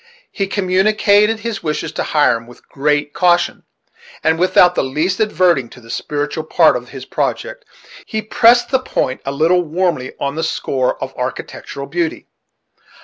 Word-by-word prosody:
He 195 -2 -2
communicated 205 +3 +2
his 230 -3 -4
wishes 150 -1 -3
to - - -3
Hiram 120 -6 +1
with 120 - -17
great 145 +1 0
caution; 175 -1 +1 0.6
and, 160 +1 +2
without 180 0 +4
in - - +1
the 130 - -4
least 170 +9 -1
adverting 175 - +2
to - - -14
the 115 -1 -12
spiritual 150 +3 -3
part 160 -1 +4
of 125 0 -5
his 130 -2 -9
project, - - -3 0.4
he 220 - -3
pressed 240 +3 +4
the 265 - +3
point 130 - -2
a - - 0
little 165 +6 +2
warmly 170 -5 -1
on 140 0 -2
the 160 +2 -3
score 130 -5 -1
of - - -6
architectural 140 - -5
beauty. 165 +3 -3
165 Hz, 160 wpm, -17 LUFS, 140-195 Hz, 0.6 s, without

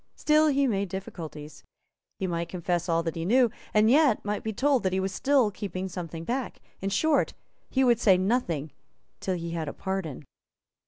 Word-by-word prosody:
Still 305 +1 +4
he 280 -1 +3
made 200 -6 0
difficulties. 160 -5 -7 0.5
He 190 - -2
might 170 -2 -2
confess 175 0 -2
all 165 0 +2
that 165 -1 -2
he 165 - -4
knew, 240 +5 +4 0.2
and 215 0 +4
yet 270 -3 +4
might 210 0 -1
be 220 - -2
told 270 +4 +2
that 185 -1 0
he 190 - +1
was 190 0 -1
still 260 +1 +2
keeping 190 -2 -4
something 170 -3 -6
back. 250 +7 -3 0.2
In 195 - -2
short, 290 +10 +2 0.3
he 265 - +2
would 240 -3 +4
say 195 -6 +5
nothing 180 - 0 0.5
till 185 - -1
he 170 -1 -5
had 165 -2 -3
a - - -4
pardon. 190 -8 -4
190 Hz, 190 wpm, -27 LUFS, 170-240 Hz, 0.5 s, say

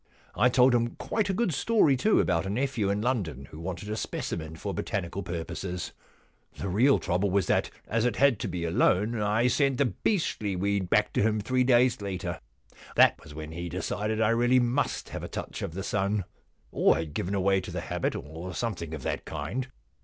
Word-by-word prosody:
I 125 - +4
told 125 +1 +5
him 120 -1 +1
quite 215 -3 -1
a - - +1
good 215 -6 +1
story, 160 -2 +3
too, 215 +12 +3
about 85 +1 +1
a - - -3
nephew 120 -2 0
in 100 +2 0
London 90 - -1
who 75 - -9
wanted 90 +3 -5
a 105 - -2
specimen 80 -6 -4
for 100 +4 -4
botanical 95 +1 -3
purposes. 90 +1 -4 0.7
The 95 - -3
real 125 +9 +4
trouble 95 +2 0
was 95 -1 +2
that, - - +1 0.2
as 115 0 0
it 120 -3 +1
had 140 -6 +4
to - - -2
be 85 -2 -3
a 80 - -1
loan, 105 +6 +2
I 105 +3 +2
sent 135 +1 +2
the 140 - +3
beastly 120 - -1
weed 100 0 0
back - - +2
to - - +2
him 110 0 +2
three 125 +4 +1
days 125 -2 +4
later. 95 -2 -4 0.6
That - - +5
was 75 -2 -12
when 80 0 -7
he 85 +1 -5
decided 105 +5 -2
I 110 -1 +3
really 120 +2 +4
must 120 +3 0
have - - -5
had - - -6
a - - -26
touch - - -5
of 80 - -4
the 95 - -3
sun, 100 +1 0 0.5
or - - +4
had 80 -2 -4
given 95 +5 -1
way 95 0 +3
to 90 - -8
the 90 0 -4
habit, 90 -1 -2
or 80 +5 -7
something 85 -9 -3
of 70 - -8
that - - -2
kind. 130 +1 -4
100 Hz, 210 wpm, -28 LUFS, 90-120 Hz, 0.7 s, told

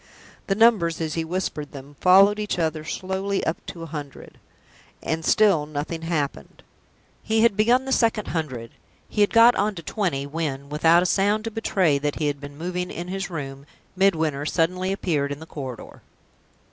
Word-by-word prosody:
The 195 - +1
numbers, 205 -7 +3
as 160 -2 -2
he 165 - -1
whispered 160 -3 -4
them, 140 +1 -11
followed 195 +3 +6
each 210 -3 -2
other 160 -2 -1
slowly 190 +4 -2
up 160 - -2
to 170 - -7
a - - -5
hundred, 145 -3 -9 0.6
and 160 0 -2
still 190 -6 +3
nothing 155 +2 -4
happened. 150 - -3 0.6
He 220 0 +1
had 230 -4 +4
begun 240 +5 +3
the 265 - -4
second 225 -4 +1
hundred; 130 -9 -4 0.4
he 210 - -1
had 205 - +4
got 230 +1 +7
on 205 +1 0
to 170 - -8
twenty 155 -7 -2
when, 140 -2 -4
without 165 +4 +4
a - - -2
sound 205 +3 +2
to 225 - -4
betray 185 -9 +1
that 145 0 -2
he 155 - -2
had 145 -1 -2
been 145 0 -9
moving 180 +2 -3
in 175 +1 -6
his 195 +1 -3
room, 140 -4 -7 0.3
Midwinter 160 -7 +1
suddenly 180 +4 0
appeared 150 -7 -1
in 145 - -5
the 160 - -10
corridor. 130 -6 -8
165 Hz, 180 wpm, -24 LUFS, 150-195 Hz, 0.6 s, got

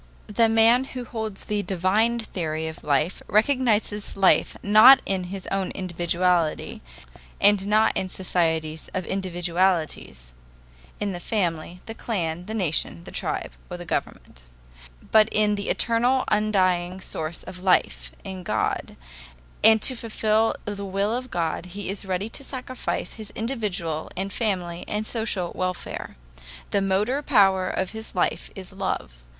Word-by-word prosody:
] - - -28
The 225 +2 +2
man 225 +3 +5
who 250 - -4
holds 220 -4 -5
the 210 -1 0
divine 200 +5 +1
theory 160 -8 -3
of 160 - -8
life 150 +4 +1
recognizes 215 -3 +1
life 195 -1 +3
not 215 +6 +9
in 190 -2 -1
his 190 +1 -7
own 195 -1 -1
individuality, 175 -2 0 0.6
and 205 -1 +4
not 215 +1 +3
in 185 - -1
societies 160 -4 -1
of 185 -1 -2
individualities 175 - -1 0.7
(in 205 -1 -1
the 175 - -5
family, 175 -3 -2
the 225 - -6
clan, 180 -6 -3
the 220 - -4
nation, 160 - -1
the - - -11
tribe, - - -2 0.2
or - - -5
the - - -8
government), - - -4 0.7
but 215 0 +6
in 210 -1 +2
the 200 -1 -3
eternal 245 +3 +2
undying 185 -4 +1
source 160 -3 -4
of 185 -1 -9
life - - +1
in 190 -1 -6
God; 175 - -2 0.7
and 220 0 +6
to 260 - +4
fulfill 220 -1 +1
the 205 -1 -4
will 200 +3 0
of 255 +1 -5
God 170 -1 -2
he 200 -2 -4
is 200 0 -5
ready 190 +2 -2
to 250 - -5
sacrifice 255 -1 -4
his 215 -2 -9
individual 205 - -3
and 195 +1 -3
family 180 -6 -2
and 210 +1 -2
social 215 -6 -2
welfare. 185 -1 -4 0.6
The 200 - +2
motor 205 +8 +1
power 195 -9 +4
of 190 -1 -2
his 220 -2 -9
life 180 - 0
is 190 0 -9
love. 125 - -4
195 Hz, 145 wpm, -25 LUFS, 175-220 Hz, 0.7 s, not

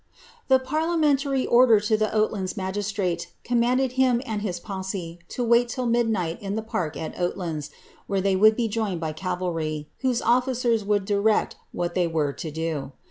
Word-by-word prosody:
^ - - -42
The 265 - +6
parliamentary 285 -1 +1
order 240 -3 +6
to 210 +1 +2
the 215 0 +1
Oatlands 215 -3 0
magistmte 190 -3 -2 0.2
comnmnded 245 +2 +2
him 255 -2 +3
tod 220 -5 -3
his 180 -4 -3
posse 190 -3 -5
to 250 - -3
wait 235 +1 +4
till 255 +1 -3
midnight 225 -8 0
in 200 0 -3
the 220 - -2
park 175 -8 -3
at 160 - -5
Oatlands, 170 -4 -2 0.4
where 195 -1 0
they 195 0 +2
would 215 +3 +6
be 235 -1 0
joined 210 -5 -2
by 160 -2 -3
cavalry, 165 -4 -3
whose 255 -3 +1
officers 240 -2 +2
woald 205 -1 +1
direct 205 +1 +1 0.2
what 175 0 -2
they 180 -1 +1
were 155 -4 0
to 155 +4 -6
do. 155 -3 -3
205 Hz, 175 wpm, -25 LUFS, 175-240 Hz, 0.4 s, The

